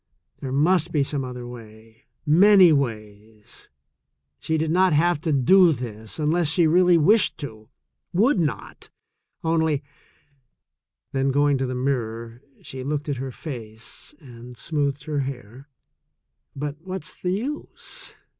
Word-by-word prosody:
There 130 - -5
must 165 +4 +2
be 150 -3 +2
some 140 0 -3
other 125 -1 -7
way 115 -1 -13
— - - -56
many 185 +2 +6
ways. 110 -5 -5 0.7
She 160 - -1
did 160 0 -1
not 185 0 +3
have 165 +1 +2
to 160 - -1
do 165 +6 +5
this 110 -4 -7
unless 160 +2 +1
she 165 +3 +2
really 175 +2 +5
wished 205 +7 +4
to 110 -6 -9 0.2
— - - -57
would 240 -2 +3
not 140 - -4 0.3
— - - -53
only 160 -3 +1 0.6
—. - - -58
Then 135 0 0
going 145 0 +2
to 135 - -1
the 130 - -4
mirror 115 -3 -3 0.2
she 130 -1 -7
looked 145 +1 -3
at 140 - -2
her 135 +1 -4
face 115 -3 -9
and 120 -2 -12
smoothed 145 -2 -2
her 150 -1 -2
hair. 130 0 -7 0.9
"But 145 +1 -4
what's 185 +1 -6
the 180 0 0
use?" 270 +10 -4
140 Hz, 145 wpm, -23 LUFS, 120-160 Hz, 0.9 s, many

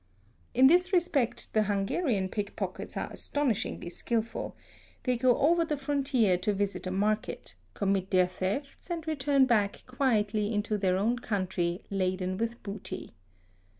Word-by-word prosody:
In 260 - +7
this 355 +6 +5
respect 335 - +1
the 215 - +4
Hungarian 205 - 0
pickpockets 205 +1 -4
are - - -3
astonishingly 235 -10 -1
skilful; 230 +5 -2 0.5
they 250 -1 +1
go 245 0 +3
over 335 +4 +4
the 305 -2 -2
frontier 270 -9 +2
to 205 +3 0
visit 200 -1 -2
a - - -2
market, 210 +3 -1 0.2
commit 195 -1 0
their 185 -1 +4
thefts, 190 - -4
and 335 -2 -3
return 280 -3 +3
back 210 -5 +1
quietly 220 -5 +1
into 210 0 0
their 185 -2 +2
own 230 +5 +1
country 185 -5 -1
laden 185 -1 -1
with 230 +1 -3
booty. 205 -1 -6
215 Hz, 140 wpm, -29 LUFS, 195-270 Hz, 0.5 s, In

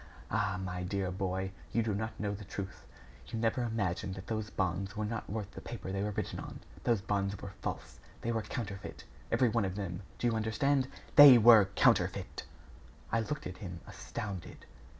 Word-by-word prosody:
Ah! 100 -3 0
my 90 -1 -4
dear 95 0 -1
boy, 95 0 -2 0.2
you 115 - +2
do 110 -1 0
not 110 +2 -3
know 105 -1 -1
the 105 +1 -7
truth. 95 0 -7 0.4
You 115 - -4
never 115 +2 +1
imagined 100 -5 -1
that 95 0 -8
those 110 0 -3
bonds 95 +2 -2
were 105 - 0
not 110 +1 -4
worth 105 -1 -4
the - - -9
paper 115 -5 -6
they 100 0 -1
were 105 - 0
written 105 -1 -3
on. - - -7 0.3
Those 115 -5 +3
bonds 100 0 -1
were 100 -1 -7
false - - -5 0.2
they 115 - -1
were 115 -1 0
counterfeit 105 -4 -6 0.3
every 125 -3 +4
one 115 -1 +1
of 95 -1 -2
them 95 -3 -4 0.2
do - - -3
you 120 - +3
understand? 130 +5 +1 0.3
THEY 145 -4 +12
WERE 110 -2 +8
COUNTERFEIT!" - - +2 0.7
I 115 - +3
looked 150 +7 -3
at 90 +1 -6
him, 90 -5 -7
astounded. 100 -5 -7
105 Hz, 190 wpm, -32 LUFS, 95-115 Hz, 0.7 s, THEY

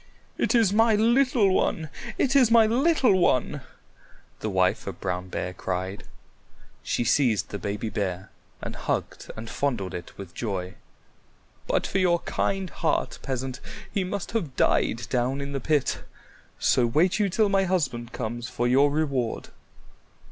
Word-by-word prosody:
"It - - +1
is 220 -5 +4
my 225 +1 +4
little 235 -2 +3
one! 160 -4 0 0.3
It 275 0 +1
is 255 -5 +6
my 230 -1 +6
little 250 - +3
one!" 140 -2 +1 0.8
the 110 - -3
wife 95 -2 +1
of - - -6
Brown 90 +1 -3
Bear 90 0 -3
cried. 95 +2 -4 0.8
She - - -1
seized 115 -4 +2
the 100 - -5
baby 105 +3 -3
bear 95 -3 -3 0.3
and - - -5
hugged - - -3
and 110 +1 -7
fondled 115 -8 -2
it 85 - -8
with 95 -3 -9
joy. 95 -3 -3 0.9
"But - - +1
for 195 - -1
your 175 -2 +3
kind 195 -2 -2
heart, 160 - -1
Peasant, 130 -1 -4 0.3
he 195 - +1
must 190 +1 -4
have 170 - -2
died 120 -2 +1
down 130 +2 0
in 140 0 -4
the 140 - -2
pit; 150 +1 +1 0.6
so 120 -2 +3
wait 175 - +2
you 205 -2 +2
till 210 +3 +2
my 195 -1 +2
husband 130 -11 -1
comes 120 +2 -4
for 120 - -1
your 135 +4 +4
reward." 140 -6 -1
140 Hz, 155 wpm, -26 LUFS, -, 0.9 s, is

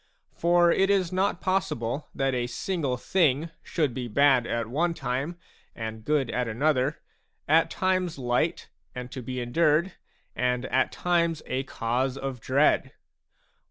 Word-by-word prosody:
For 175 0 +4
it 195 +2 +3
is 190 -3 +2
not 190 -1 0
possible 150 - -1
that 135 -1 0
a 120 -1 -1
single 140 0 -2
thing 160 +1 +1
should 150 -7 -1
be 125 0 -4
bad 130 +1 +4
at 115 0 -1
one 165 +9 0
time 135 +5 -3 0.4
and 110 -1 -6
good 145 -2 +1
at 125 -1 -1
another, 135 +4 0 0.4
at 160 +2 +4
times 185 -3 0
light 130 +6 0 0.3
and 125 0 -6
to 130 - -6
be 125 +1 -5
endured, 155 +8 +2 0.4
and 125 0 0
at 130 - +1
times 170 -3 0
a 130 - -1
cause 125 +2 -1
of 135 -2 -4
dread. 140 +6 +2
135 Hz, 145 wpm, -27 LUFS, 125-170 Hz, 0.4 s, For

